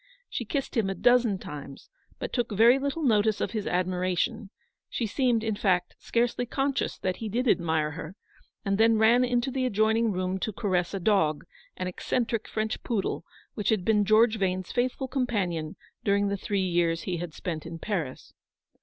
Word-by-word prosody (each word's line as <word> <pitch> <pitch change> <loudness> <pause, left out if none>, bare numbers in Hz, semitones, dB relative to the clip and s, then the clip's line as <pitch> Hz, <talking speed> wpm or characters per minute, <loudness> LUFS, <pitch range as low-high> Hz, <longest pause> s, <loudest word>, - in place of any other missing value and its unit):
She 240 - -3
kissed 275 +5 -3
him 220 -5 +1
a 195 - -2
dozen 245 -1 +4
times, 140 -5 -9 0.3
but - - -5
took 240 -3 0
very 230 +6 +6
little 280 +4 -2
notice 215 -4 +3
of - - -1
his 215 -3 -3
admiration 180 +2 -1 0.2
— - - -57
she 235 - -2
seemed, 235 0 +1
in 220 -2 -1
fact, 180 -4 +1
scarcely 240 +1 0
conscious 270 +2 -1
that 185 -1 -2
he 225 - -4
did 245 +5 -1
admire 160 -6 +2
her 155 +4 -7 0.2
— - - -37
and 195 +1 0
then 225 0 +5
ran 230 +3 +5
into 245 +1 0
the 260 0 -1
adjoining 220 +1 +2
room 185 0 -2
to 220 - -2
caress 185 -3 0
a - - -2
dog, 170 -6 +2 0.3
an 185 - -3
eccentric 225 +5 -2
French 220 +1 -2
poodle, 225 -6 -2 0.3
which 210 - -2
had 210 -5 +1
been 210 -2 +3
George 220 +2 +4
Vane's 185 -1 -1
faithful 255 +2 -1
companion 195 - -1 0.3
during 200 0 +2
the 200 - 0
three 200 0 -1
years 170 -2 +1
he 180 -2 -2
had 170 -2 -6
spent 165 -4 -4
in 165 0 -6
Paris. 160 -8 -4
210 Hz, 185 wpm, -27 LUFS, 180-235 Hz, 0.3 s, very